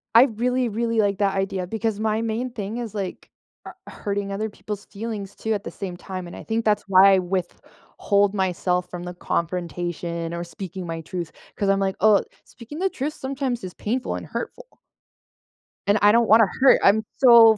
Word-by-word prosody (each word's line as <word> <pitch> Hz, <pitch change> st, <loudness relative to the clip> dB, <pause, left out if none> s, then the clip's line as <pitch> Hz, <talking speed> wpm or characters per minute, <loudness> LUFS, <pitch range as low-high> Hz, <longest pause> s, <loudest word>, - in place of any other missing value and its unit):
I 235 Hz, -, +10 dB
really, 250 Hz, +1 st, +1 dB
really 230 Hz, +1 st, -1 dB
like 200 Hz, -2 st, +2 dB
that 195 Hz, -1 st, +2 dB
idea 195 Hz, -2 st, -1 dB
because 220 Hz, 0 st, -2 dB
my 220 Hz, 0 st, 0 dB
main 230 Hz, +3 st, -2 dB
thing 215 Hz, 0 st, -5 dB
is, 235 Hz, -4 st, -5 dB
like, 195 Hz, -3 st, -5 dB, 0.4 s
uh, -, -, -7 dB, 0.2 s
hurting 200 Hz, -1 st, -3 dB
other 215 Hz, +2 st, -2 dB
people's 205 Hz, 0 st, -7 dB
feelings, 205 Hz, -2 st, -6 dB
too, 220 Hz, 0 st, -2 dB
at 205 Hz, 0 st, -3 dB
the -, -, -6 dB
same 180 Hz, -3 st, -6 dB
time, 185 Hz, -1 st, -6 dB
and -, -, -9 dB
I -, -, -9 dB
think 225 Hz, 0 st, -2 dB
that's 210 Hz, -1 st, +2 dB
why 195 Hz, +1 st, +7 dB
I -, -, +3 dB
withhold 190 Hz, +2 st, -1 dB
myself 180 Hz, -2 st, 0 dB
from 175 Hz, -1 st, -6 dB
the 180 Hz, -, -6 dB
confrontation 170 Hz, -1 st, -3 dB
or 170 Hz, 0 st, -3 dB
speaking 180 Hz, +2 st, -7 dB
my 165 Hz, -1 st, -4 dB
truth, 170 Hz, 0 st, -5 dB, 0.2 s
'cause 200 Hz, -, 0 dB
I'm 195 Hz, 0 st, +3 dB
like, 195 Hz, -1 st, 0 dB
"Oh, 215 Hz, -1 st, +5 dB, 0.2 s
speaking 260 Hz, +7 st, -10 dB
the 385 Hz, -, +1 dB
truth 295 Hz, -2 st, -3 dB
sometimes 265 Hz, -4 st, -3 dB
is 185 Hz, -1 st, -6 dB
painful 245 Hz, +4 st, -2 dB
and -, -, -6 dB
hurtful." -, -, -7 dB, 1.1 s
And 205 Hz, -, +4 dB
I 205 Hz, -, +7 dB
don't 235 Hz, +1 st, +4 dB
wanna 220 Hz, -1 st, +7 dB
hurt 270 Hz, -, +7 dB
I'm 215 Hz, +2 st, +5 dB
so 230 Hz, -4 st, +8 dB
205 Hz, 190 wpm, -23 LUFS, 185-225 Hz, 1.1 s, I